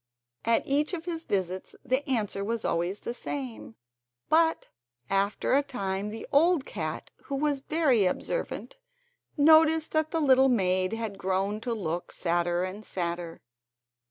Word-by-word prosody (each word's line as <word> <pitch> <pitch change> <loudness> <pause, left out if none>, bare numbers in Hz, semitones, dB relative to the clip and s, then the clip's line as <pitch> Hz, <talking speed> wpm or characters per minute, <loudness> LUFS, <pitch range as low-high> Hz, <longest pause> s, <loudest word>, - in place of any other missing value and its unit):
At 230 0 +2
each 295 +6 +1
of 330 -1 -8
his 330 -2 -4
visits 185 -2 -2
the 260 +2 +1
answer 210 -5 -1
was 225 +2 -2
always 175 +4 -1
the 235 - -4
same; 125 - -6 0.5
but 325 0 +3 0.4
after 195 +4 +1
a 280 - +5
time 205 -7 -3
the 220 +2 -7
old 320 0 +4
cat, 155 -5 -5
who 280 - -3
was 290 0 0
very 275 - +2
observant, - - -3 0.6
noticed 315 +1 +5
that 315 0 +1
the 330 - -1
little 265 -3 +5
maid 185 -4 +2
had 220 -3 -4
grown 195 +3 -1
to 240 0 -2
look 175 -4 -3
sadder 175 0 0
and 190 +3 -5
sadder. 170 -3 -4
215 Hz, 145 wpm, -28 LUFS, 185-285 Hz, 0.6 s, a